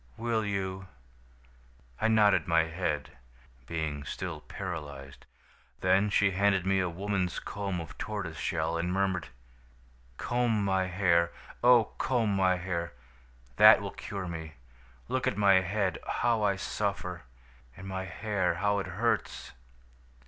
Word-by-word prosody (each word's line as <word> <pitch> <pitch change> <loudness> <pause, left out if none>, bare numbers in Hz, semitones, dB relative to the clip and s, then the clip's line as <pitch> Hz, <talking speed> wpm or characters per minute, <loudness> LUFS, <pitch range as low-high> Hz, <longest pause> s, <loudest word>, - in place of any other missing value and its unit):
"'Will 115 -1 0
you?' 95 -2 -3 1.1
"I 110 - +3
nodded 110 -2 +4
my 85 -1 +4
head, 80 -2 -3 0.6
being 80 -3 -3
still 75 - -5
paralyzed. 75 -7 -7 0.5
"Then 95 +3 +3
she 100 0 +3
handed 95 -1 +2
me 95 0 +2
a 90 -1 0
woman's 95 0 -2
comb 100 -3 -4
of 80 -3 -8
tortoise 100 -7 -4
shell, 80 -1 -1
and 90 +1 -1
murmured: 95 -3 0 0.9
"'Comb 120 -4 0
my 95 -1 +1
hair! 85 -2 +2 0.3
Oh, 120 -3 +6
comb 115 -6 +1
my 95 -1 +3
hair! 85 -2 -3 0.6
That - - +9
will - - -5
cure 100 -3 -6
me. 80 -2 -6 0.5
Look 130 0 -1
at 105 - 0
my 100 -2 +6
head 95 -2 -1
how 115 -2 +1
I 100 -2 +2
suffer! 95 -2 -3 0.6
And 95 - -9
my 95 0 -4
hair 100 -2 -1
how 100 +1 +1
it 95 - -4
hurts!' 105 +6 -1
95 Hz, 135 wpm, -29 LUFS, 85-100 Hz, 1.1 s, That